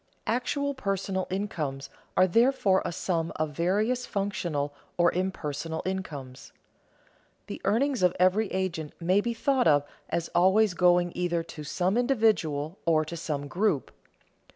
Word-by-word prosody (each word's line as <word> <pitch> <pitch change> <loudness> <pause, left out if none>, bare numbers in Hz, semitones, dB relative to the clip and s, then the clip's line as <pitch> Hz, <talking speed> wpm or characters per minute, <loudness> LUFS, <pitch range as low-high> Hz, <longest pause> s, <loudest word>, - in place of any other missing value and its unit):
Actual 280 +4 -1
personal 195 -5 -2
incomes 160 -8 -3 0.3
are 185 - +7
therefore 220 -1 +3
a - - -3
sum 165 -1 -1
of 155 -1 -1
various 210 - 0
functional 170 -8 -2 0.2
or 175 0 +4
impersonal 165 -3 -3
incomes. 150 -9 -5 0.9
The - - -7
earnings 250 +5 +1
of 180 0 +3
every 190 +3 +3
agent 175 -5 -2
may 185 +4 +3
be 235 +1 -2
thought 265 -3 +2
of 145 -2 +5 0.3
as 170 -1 -1
always 190 +3 +4
going 175 -1 +3
either 175 -2 -1
to 155 -2 -9
some 185 +7 0
individual 205 - +1
or 155 -2 +3
to 170 - -6
some 150 -3 -3
group. 180 -3 0
185 Hz, 135 wpm, -28 LUFS, 160-205 Hz, 0.9 s, are